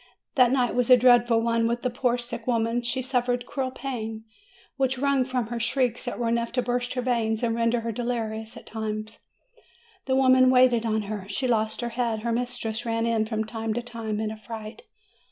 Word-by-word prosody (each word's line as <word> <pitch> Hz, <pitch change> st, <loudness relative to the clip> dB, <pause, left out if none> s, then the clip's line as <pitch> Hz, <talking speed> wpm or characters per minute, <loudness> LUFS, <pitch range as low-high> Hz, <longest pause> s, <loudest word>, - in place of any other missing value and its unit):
That 250 Hz, -4 st, +5 dB
night 250 Hz, -2 st, +2 dB
was 245 Hz, 0 st, +1 dB
a 250 Hz, -, +9 dB
dreadful 240 Hz, -1 st, +5 dB
one 230 Hz, 0 st, +1 dB
for 235 Hz, -, +1 dB
the 245 Hz, +1 st, -3 dB
poor 245 Hz, 0 st, +1 dB
sick 240 Hz, -1 st, -6 dB
woman. 230 Hz, 0 st, +1 dB
She 245 Hz, +2 st, -1 dB
suffered 245 Hz, -1 st, 0 dB
cruel 265 Hz, -1 st, -2 dB
pain, 225 Hz, -5 st, -5 dB, 0.5 s
which 265 Hz, -1 st, 0 dB
wrung 275 Hz, -1 st, +2 dB
from 250 Hz, -3 st, -2 dB
her 240 Hz, 0 st, -3 dB
shrieks 245 Hz, +1 st, 0 dB
that 245 Hz, -, -4 dB
were 235 Hz, -, -1 dB
enough 235 Hz, 0 st, 0 dB
to 250 Hz, 0 st, +1 dB
burst 245 Hz, 0 st, -1 dB
her 250 Hz, -, -1 dB
veins, 230 Hz, -2 st, 0 dB
and 230 Hz, -1 st, +1 dB
rendered 230 Hz, 0 st, +1 dB
her 230 Hz, -, -2 dB
delirious 225 Hz, -2 st, -3 dB
at -, -, -12 dB
times. 215 Hz, 0 st, -5 dB, 0.9 s
The 260 Hz, -, +2 dB
women 260 Hz, -1 st, +5 dB
waited 250 Hz, -3 st, +4 dB
on 220 Hz, -1 st, 0 dB
her. 205 Hz, -1 st, -6 dB
She 255 Hz, +6 st, -1 dB
lost 220 Hz, -2 st, 0 dB
her 240 Hz, -, -2 dB
head. 230 Hz, -2 st, -1 dB
Her 235 Hz, +1 st, -1 dB
mistress 240 Hz, -2 st, -2 dB
ran 230 Hz, -1 st, -1 dB
in, 225 Hz, -2 st, +1 dB
from 220 Hz, -1 st, -1 dB
time 220 Hz, 0 st, -4 dB
to 240 Hz, -, -2 dB
time, 225 Hz, -3 st, -4 dB
in 215 Hz, -1 st, -2 dB
affright. 220 Hz, -, -8 dB
235 Hz, 205 wpm, -26 LUFS, 225-250 Hz, 0.9 s, a